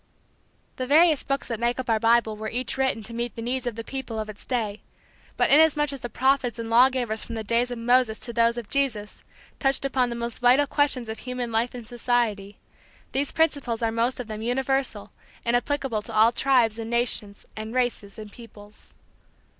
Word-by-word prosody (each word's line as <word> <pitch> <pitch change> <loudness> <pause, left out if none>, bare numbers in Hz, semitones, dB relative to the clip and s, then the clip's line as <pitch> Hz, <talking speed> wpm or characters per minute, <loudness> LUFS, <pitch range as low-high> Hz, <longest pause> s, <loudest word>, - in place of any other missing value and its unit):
The 255 - -3
various 310 +1 +5
books 275 0 -3
that 230 -3 -4
make 240 +2 0
up 260 - -4
our 225 -2 +2
Bible 230 -1 +3
were 215 +1 -5
each 245 0 -2
written 265 -4 0
to 230 - -5
meet 235 0 -4
the 230 - -6
needs 250 +1 -2
of 235 - -3
the 230 - -6
people 265 -3 -5
of 215 0 -4
its 205 - -9
day; 220 -5 -2 0.6
but - - +2
inasmuch 295 -1 +4
as 275 - -7
the 240 - -5
prophets 260 0 +1
and 230 -1 -5
law 245 +3 +7
givers 240 -4 -2
from 230 - -7
the 220 - -4
days 235 +3 +1
of 245 - -5
Moses 240 -1 +2
to 235 - -6
those 230 +1 +2
of 235 -3 -5
Jesus 230 -7 -2 0.4
touched 270 0 +1
upon 255 -2 +1
the 235 - -4
most 235 -1 -4
vital 250 +4 +5
questions 280 -4 +1
of 220 0 -6
human 250 -2 -4
life 230 +3 0
and 240 -3 -8
society, 230 -5 -1 0.5
these 275 +1 -1
principles 285 -8 0
are 225 - +1
most 235 +3 0
of 250 - -4
them 215 -1 -6
universal 260 -2 -1 0.3
and 235 +1 +2
applicable 265 -3 -1
to 225 - -10
all 220 +2 +6
tribes 240 -4 +2
and 225 0 -5
nations 235 -4 -2
and 220 +2 -6
races 240 -5 -1
and 215 -1 -9
peoples. 210 -3 -15
240 Hz, 205 wpm, -25 LUFS, 225-260 Hz, 0.6 s, law